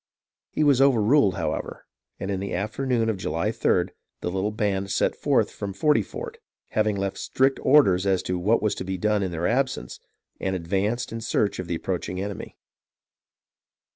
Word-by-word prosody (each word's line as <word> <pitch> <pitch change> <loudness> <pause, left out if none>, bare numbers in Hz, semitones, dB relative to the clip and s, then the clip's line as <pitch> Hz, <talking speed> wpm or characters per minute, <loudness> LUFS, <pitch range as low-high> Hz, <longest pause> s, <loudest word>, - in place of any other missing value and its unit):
He - - 0
was 140 -3 +4
overruled, 120 -4 +4
however, - - -3 0.3
and 95 - -3
in 95 - -1
the 100 -1 -3
afternoon 115 +4 0
of 110 -3 0
July 85 -2 -1
3d, - - +1 0.3
the 90 - -2
little 95 +3 0
band 100 -2 -1
set - - +1
forth - - +1
from 100 -1 -5
Forty 150 +9 +3
Fort, 460 +1 -7 0.3
having 110 -1 +1
left 100 0 -3
strict 135 +1 +1
orders 100 -10 +5
as 95 -2 +2
to 90 -1 -2
what 110 +6 +2
was 105 - +2
to - - -5
be 95 0 -3
done 105 +2 +1
in 95 - -1
their 85 0 -3
absence, 130 - -1 0.4
and 95 0 -1
advanced 100 +7 -1
in 115 0 -5
search 105 -2 0
of 90 - -4
the 85 - -1
approaching 90 +1 -3
enemy. 100 0 -6
100 Hz, 175 wpm, -25 LUFS, 95-120 Hz, 0.4 s, orders